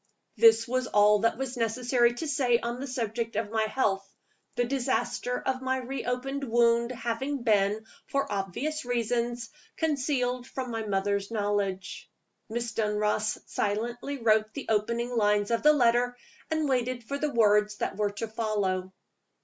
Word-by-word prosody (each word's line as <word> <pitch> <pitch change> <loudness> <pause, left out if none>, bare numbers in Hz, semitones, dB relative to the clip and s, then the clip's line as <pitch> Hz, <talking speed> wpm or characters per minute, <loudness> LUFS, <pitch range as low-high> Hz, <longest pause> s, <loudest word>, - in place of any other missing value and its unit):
This 225 0 +6
was 255 +1 0
all 210 0 +5
that 230 +2 +2
it - - -16
was 265 -1 -3
necessary 240 +1 +2
to 315 +6 -4
say 260 -5 +2
on 235 +1 -4
the 275 - -4
subject 230 -3 -3
of 215 -1 -2
my 220 -1 +1
health; 205 -4 0 0.5
the 245 - +2
disaster 250 -1 -1
of 260 0 -2
my 260 0 0
re 260 +1 -5
opened 270 +3 -2
wound 235 -1 +3
having 255 +3 -3
been, 210 -1 +2 0.2
for 275 -5 -1
obvious 205 - -2
reasons, 240 -1 -1 0.3
concealed 255 -5 0
from 255 -2 -5
my 225 -1 -3
mother's 200 0 0
knowledge. 205 -3 -2 0.4
Miss 235 +1 -3
Dunross 210 0 0
silently 235 +7 -2
wrote 220 -2 +2
the 280 - -5
opening 235 +3 0
lines 210 -1 +2
of 230 - +1
the 300 - +7
letter, 245 -2 +2 0.3
and 315 -1 0
waited 250 -2 0
for 280 +5 -4
the 300 - 0
words 210 -2 +3
that - - -2
were 210 -1 +1
to 205 +3 -5
follow. 205 -4 -1
235 Hz, 155 wpm, -28 LUFS, 210-255 Hz, 0.5 s, the